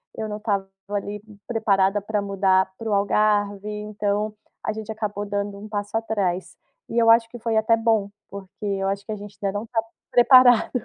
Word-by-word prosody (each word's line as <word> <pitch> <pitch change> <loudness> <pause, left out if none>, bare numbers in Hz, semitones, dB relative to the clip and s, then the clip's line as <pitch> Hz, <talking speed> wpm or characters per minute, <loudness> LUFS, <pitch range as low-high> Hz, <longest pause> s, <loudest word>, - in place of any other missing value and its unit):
eu 220 - -4
não 210 0 -4
estava, 200 -3 -1 0.2
ali, 205 0 -3 0.3
preparada 205 -4 +2
pra 210 +1 -1
mudar 190 -1 +2
para 225 -1 -5
o - - +1
Algarve, 205 0 +1
então 210 0 -2 0.3
a 215 - 0
gente 220 0 -6
acabou 210 -2 -3
dando 200 0 -3
um 215 +1 -10
passo 205 0 -4
atrás 200 -5 -2 0.3
e 230 - -3
eu 230 -1 +5
acho 230 0 +5
que 240 - -9
foi 230 -1 -1
até 220 +1 +3
bom, 225 -3 +1 0.2
porque 200 +2 -9
eu 195 -1 -1
acho 200 +1 -3
que - - -6
a - - -2
gente 205 -1 -11
ainda 200 0 -1
não 215 - -7
tá 225 -1 0 0.3
preparado. 245 -1 +6
210 Hz, 195 wpm, -23 LUFS, 200-220 Hz, 0.3 s, preparado